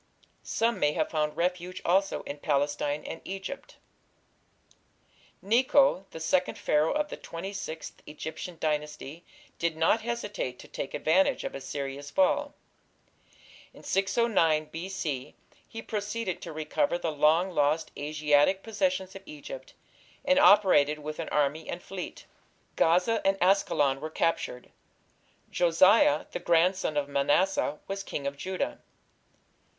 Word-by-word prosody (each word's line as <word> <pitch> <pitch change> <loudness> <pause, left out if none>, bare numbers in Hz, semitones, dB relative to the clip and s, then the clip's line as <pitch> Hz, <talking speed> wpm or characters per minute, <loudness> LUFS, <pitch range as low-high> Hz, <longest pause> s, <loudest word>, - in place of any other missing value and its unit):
Some 230 +1 0
may 150 0 +2
have 155 -1 -1
found 150 -1 -1
refuge 180 +1 -2
also 195 +3 +2
in 145 - -7
Palestine 145 0 0
and 165 - -6
Egypt. 195 +9 -7 1.7
Necho, 240 -1 +3
the 160 - -9
second 180 +3 0
Pharaoh 150 +1 +2
of 300 0 -1
the - - -6
Twenty 185 +4 -7
sixth 165 -5 -7
Egyptian 160 +3 -7
Dynasty, 150 +1 -3 0.4
did 165 -1 -1
not 165 +8 +3
hesitate 210 - -4
to - - -13
take 135 - -5
advantage 180 +5 +2
of - - -4
Assyria's 140 +1 -5
fall. 285 - +1 1.2
In - - -14
609 190 -7 +2
B.C. 165 -6 -4 0.3
he 225 - -7
proceeded 210 -2 -3
to 170 - -7
recover 160 - 0
the 165 -2 -2
long 155 +5 +3
lost 150 0 +1
Asiatic 150 +5 +2
possessions 225 -4 -1
of 195 - -8
Egypt, 405 +12 -9 0.5
and 275 0 +4
operated 185 - +5
with 155 +1 -7
an 165 - -4
army 150 +2 0
and 170 - -4
fleet. 190 -2 -7 0.5
Gaza 180 +7 +3
and 195 0 +2
Askalon 150 -8 +2
were 155 - -4
captured. 160 -6 -2 0.8
Josiah, 175 -2 +4
the - - -4
grandson 170 -1 +2
of 145 -1 0
Manasseh, 145 +3 +1
was 195 0 -3
King 145 -7 -5
of 140 0 -2
Judah. 185 +6 -3
170 Hz, 130 wpm, -28 LUFS, 150-195 Hz, 1.7 s, operated